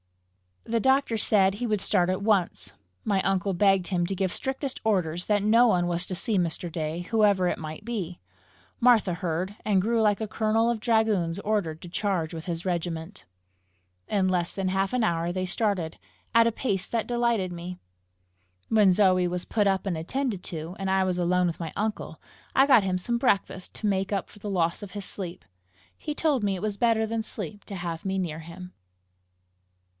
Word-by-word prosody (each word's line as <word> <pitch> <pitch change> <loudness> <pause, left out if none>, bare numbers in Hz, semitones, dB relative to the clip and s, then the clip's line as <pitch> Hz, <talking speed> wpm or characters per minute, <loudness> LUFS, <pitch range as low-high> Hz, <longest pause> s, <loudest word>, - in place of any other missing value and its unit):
The 230 0 0
doctor 265 0 +2
said 195 -2 +3
he 240 +3 -3
would 210 -3 0
start 180 -3 +2
at 185 +1 -1
once. 190 - +1 0.3
My 200 -2 +1
uncle 195 0 0
begged 195 0 +3
him 175 -3 0
to 195 +2 -3
give 190 -1 0
strictest 265 0 -3
orders 180 -5 0
that 205 -1 +1
no 230 +3 +5
one 180 -5 +2
was 175 0 0
to 185 - -3
see 205 +3 0
Mr. 170 0 -1
Day, 160 +1 -3
whoever 205 -5 +4
it - - -1
might 155 +5 -7
be. 195 -7 -4 0.6
Martha 225 -7 +4
heard, 180 +2 -3
and 200 -3 +3
grew 225 +3 +1
like 210 -1 +2
a 220 - -2
colonel 220 +2 +1
of 235 - -2
dragoons 215 -7 +1
ordered 200 -7 -1
to 175 - -9
charge 180 -4 -1
with 160 -1 -7
his 170 0 -4
regiment. 175 +1 -3 0.8
In 195 -3 +1
less 180 -2 0
than 190 -1 -1
half 195 +2 0
an 250 -2 +1
hour 170 -3 0
they 185 +1 -2
started 185 -5 0 0.4
at 230 0 +6
a - - +2
pace 200 -5 -2
that 230 -2 -2
delighted 235 -6 +1
me. 175 +1 -6 0.9
When 210 -4 +5
Zoe 185 -2 +4
was 180 0 -3
put 210 -3 +1
up 195 0 +1
and 180 -4 -1
attended 215 +4 -2
to, 165 +1 -5
and 195 0 -2
I 190 0 +3
was 185 -1 -1
alone 180 +1 +2
with 170 - -4
my 165 -3 -5
uncle, 215 0 -3 0.4
I 270 - +6
got 260 -7 +6
him 185 -1 0
some 235 +6 -1
breakfast 200 -6 0
to 215 - -3
make 195 0 0
up 195 - -2
for 205 - -16
the 205 - -5
loss 170 -2 0
of 205 -3 -8
his 200 0 -6
sleep. 180 -2 -6 0.5
He 300 -1 -5
told 295 -8 +1
me 200 -1 +1
it 180 - -6
was 210 -1 -2
better 225 0 +2
than 225 0 -2
sleep 205 -2 -7
to 200 - -6
have 170 -2 -5
me 195 0 -1
near 165 -4 -2
him. 180 +3 -10
195 Hz, 200 wpm, -26 LUFS, 175-215 Hz, 0.9 s, at